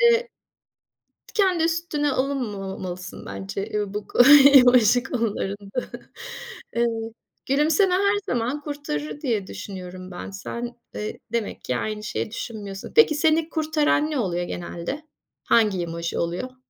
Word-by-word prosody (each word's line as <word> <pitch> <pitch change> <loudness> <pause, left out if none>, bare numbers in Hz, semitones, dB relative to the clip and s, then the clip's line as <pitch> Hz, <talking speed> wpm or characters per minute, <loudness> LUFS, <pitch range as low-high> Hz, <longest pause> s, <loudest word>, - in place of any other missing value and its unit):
Eee. 470 0 +4 1.1
Kendi 380 -5 +3
üstüne 325 -3 0
alınmamalısın 195 -9 -4
bence 95 - -5
ya 205 -1 -2
bu 210 0 -4
ko - - -7 0.4
emoji 245 -2 +7
konularında. 210 -3 -2 1.0
Eee, 235 0 +3 0.6
gülümseme 310 +7 +3
her 400 +2 +3 0.2
zaman 245 +5 -1
kurtarır 285 - -5
diye 225 -9 -1
düşünüyorum 185 -1 -8
ben. 175 +1 -7
Sen, 235 +5 -6 0.2
eee, 210 - -5
demek 230 -3 -2
ki 125 - -1
aynı 215 - -3
şeyi 215 - -3
düşünmüyorsun. 205 -3 -6
Peki, 455 -9 +7
seni 315 +1 +2
kurtaran 310 -1 +1
ne 300 - -1
oluyor 175 -6 -1
genelde? 175 - -5 0.4
Hangi 210 -6 +3
emoji 170 0 -3
oluyor? 180 +10 -3
235 Hz, 120 wpm, -24 LUFS, 195-295 Hz, 1.1 s, emoji